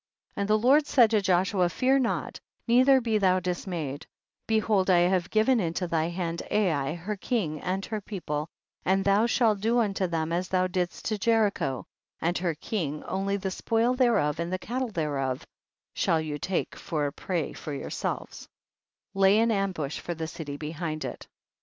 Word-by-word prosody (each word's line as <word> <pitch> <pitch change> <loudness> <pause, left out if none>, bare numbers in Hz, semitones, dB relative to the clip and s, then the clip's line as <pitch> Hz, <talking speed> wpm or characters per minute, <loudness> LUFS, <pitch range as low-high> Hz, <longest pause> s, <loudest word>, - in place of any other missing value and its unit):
38. - - -4
And 200 - -1
the 215 - +5
Lord 275 +7 +4
said 240 -7 +5
to 215 -2 +3
Joshua, 185 -1 +2
fear 260 +8 +2
not, 245 -3 -2 0.3
neither 260 +3 +6
be 225 -3 0
thou 185 -2 +3
dismayed, 175 -5 -4 0.4
behold 215 -3 +2
I 175 -2 +5
have 180 0 +2
given 225 +3 +3
into 175 -1 -1
thy 165 -2 0
hand 170 -1 -3
Ai, 160 -8 +1
her 190 +5 -4
king 190 - -2
and 190 +2 -2
her 215 -2 -4
people, 160 -7 -4 0.3
and 195 +1 +1
thou 200 +3 +4
shalt 220 -4 +2
do 230 +3 +2
unto 200 -5 +1
them 165 -1 -2
as 180 +2 -1
thou 185 0 +1
didst 180 -1 -2
to 215 -2 -1
Jericho 205 - +1 0.3
and 170 +2 0
her 175 -3 -1
king, 155 -3 -3
only 195 +1 -1
the 190 -1 -3
spoil 230 +5 +1
thereof 220 - +2
and 170 +1 -2
the 185 - 0
cattle 245 +6 -3
thereof 140 -8 -2 0.5
shall 165 - +2
you 150 -2 -4
take 185 +5 -2
for 150 -3 -2
a 140 - -3
prey 170 -6 -3
for 155 - -7
yourselves; 140 - -4 0.7
lay 195 +1 +5
an 230 +1 +3
ambush 185 -8 -1
for 175 - -5
the 160 0 -4
city 150 -3 -6
behind 155 0 -4
it. 125 - -7
185 Hz, 180 wpm, -27 LUFS, 165-215 Hz, 0.7 s, neither